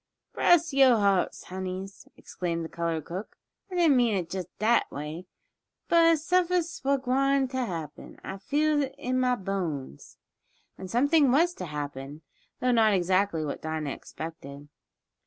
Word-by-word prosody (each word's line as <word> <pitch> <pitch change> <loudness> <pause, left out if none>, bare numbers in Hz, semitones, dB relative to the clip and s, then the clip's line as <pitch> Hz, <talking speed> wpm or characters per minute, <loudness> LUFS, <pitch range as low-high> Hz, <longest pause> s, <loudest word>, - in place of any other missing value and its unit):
"Bress 340 -3 +3
yo' 265 -3 +6
hearts, 200 -3 +1
honeys!" 185 +1 -6
exclaimed 170 -2 -4
the - - -7
colored 165 -3 -3
cook, 185 +5 -7 0.3
"I 370 - -6
didn't 335 -5 +4
mean 235 -4 +3
it 170 -3 -4
jest 185 -3 -4
dat 230 +2 +2
way. 155 +5 -6 0.6
But 330 -1 +5
suffin's 355 +1 +1
suah 275 -2 0
gwine 270 +1 +1
t' 260 +1 -5
happen 165 - -6
I 195 - -6
feels 295 +6 +1
it 265 - -12
in 255 +1 -1
mah 250 -1 +2
bones!" 175 - -5 0.6
And 190 - -9
something 285 - +3
was 335 +6 +3
to 180 - -7
happen, 145 0 -6 0.4
though 250 - +2
not 220 -3 +4
exactly 185 -2 +1
what 145 - -5
Dinah 155 -2 -3
expected. 145 -3 -9
200 Hz, 150 wpm, -27 LUFS, 165-275 Hz, 0.6 s, yo